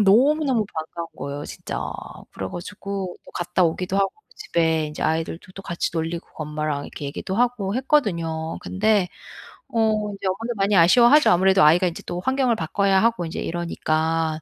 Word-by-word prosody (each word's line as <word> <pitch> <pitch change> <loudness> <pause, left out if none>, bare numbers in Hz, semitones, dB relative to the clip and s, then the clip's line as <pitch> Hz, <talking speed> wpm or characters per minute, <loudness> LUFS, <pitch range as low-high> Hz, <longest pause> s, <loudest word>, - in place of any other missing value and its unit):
너무너무 255 +4 +4
반가운 160 +1 -5
거예요 140 +1 -5
진짜. - - -6 0.5
그래 95 -1 -5
가지고 195 +1 -5
또 - - -14
갔다 175 +1 0
오기도 180 +3 -1
하고 195 -1 +2 0.2
집에 160 - +1
인제 150 - -6
아이들도 165 +3 -2
또 195 - -10
같이 170 -2 -2
놀리고 165 +1 -3
그 - - -28
엄마랑 150 -1 -3
이렇게 - - -8
얘기도 185 +7 -4
하고 230 -5 +1
했거든요. 170 - 0
근데 205 -1 +1 0.6
어 215 -2 +1
인제 195 -1 -5
엄마도 225 +6 -2
많이 200 +1 +2
아쉬워하죠 240 - +6
아무래도 190 0 +5
아이가 175 +5 +5
이제 170 - -5
또 175 - -4
환경을 260 +1 +1
바꿔야 195 +2 +2
하고 230 -6 +2
인제 165 - -5
이러니까. 160 -1 -1
185 Hz, 390 characters per minute, -23 LUFS, 160-215 Hz, 0.6 s, 아쉬워하죠